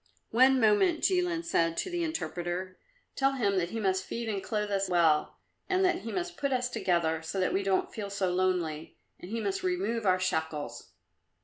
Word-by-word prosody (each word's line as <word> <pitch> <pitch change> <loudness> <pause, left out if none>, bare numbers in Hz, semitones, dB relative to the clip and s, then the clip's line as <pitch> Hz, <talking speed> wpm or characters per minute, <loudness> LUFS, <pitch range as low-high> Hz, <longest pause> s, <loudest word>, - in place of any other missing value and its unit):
"One 260 +3 +5
moment," 245 - +3
Jilin 355 -2 +1
said 165 - +1
to 370 - -2
the 350 -1 -1
interpreter; 185 - -3 0.4
"tell 270 0 +2
him 200 -7 +1
that 170 -1 -1
he 225 - -4
must 190 -2 +1
feed 235 0 -5
and 200 -2 -2
clothe 210 -1 -2
us 195 -1 0
well, 165 -4 +2 0.3
and 380 0 +3
that 365 - +2
he 225 +4 -6
must 355 -1 -3
put 280 -1 -1
us 250 -1 0
together 170 -8 0
so 165 +4 -4
that 185 - +1
we 195 - +1
don't 195 -1 0
feel 205 -2 -5
so 195 -2 -1
lonely, 180 -4 -1 0.2
and 180 - -9
he 230 +2 -2
must 385 - -2
remove 360 - -1
our 185 0 +4
shackles." 160 -4 -3
200 Hz, 195 wpm, -29 LUFS, 180-270 Hz, 0.4 s, One